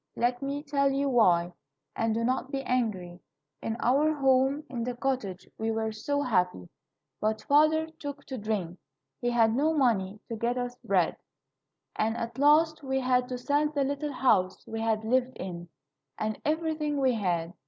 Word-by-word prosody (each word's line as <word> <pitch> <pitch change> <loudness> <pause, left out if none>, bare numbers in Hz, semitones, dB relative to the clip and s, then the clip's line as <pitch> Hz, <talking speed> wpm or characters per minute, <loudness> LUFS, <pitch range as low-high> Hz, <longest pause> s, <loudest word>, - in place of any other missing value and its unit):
Let 245 +1 0
me 280 +1 -3
tell 280 -2 +1
you 275 +1 0
why, 180 -8 +3 0.4
and 225 0 0
do 230 - 0
not 255 +2 0
be 275 -1 -3
angry. 205 -9 -1 0.4
In 225 0 -3
our 285 +6 +3
home 270 +1 +2
in 240 -4 -4
the 245 +1 -3
cottage 240 -8 -3
we 220 +1 -1
were 220 0 -1
so 285 +7 -2
happy, 180 - 0 0.5
but 215 0 -1
father 310 +4 +4
took 285 -1 -7
to 260 -3 -6
drink. 200 -5 -3 0.4
He 245 - 0
had 230 -2 +3
no 310 +5 +2
money 210 -7 +1
to 230 - -4
get 235 +3 -1
us 245 0 -3
bread, - - +1 0.8
and 225 +2 0
at 235 +1 -5
last 310 +2 +4
we 265 -1 -1
had 250 -1 +1
to 250 - -3
sell 290 +4 +1
the 290 -2 0
little 285 +2 -2
house 200 -8 +2
we 225 0 -5
had 220 -1 0
lived 255 +3 +1
in, 175 -2 -6 0.5
and 215 0 -3
everything 310 -2 0
we 260 -2 +3
had. 175 -6 -1
250 Hz, 175 wpm, -28 LUFS, 220-280 Hz, 0.8 s, father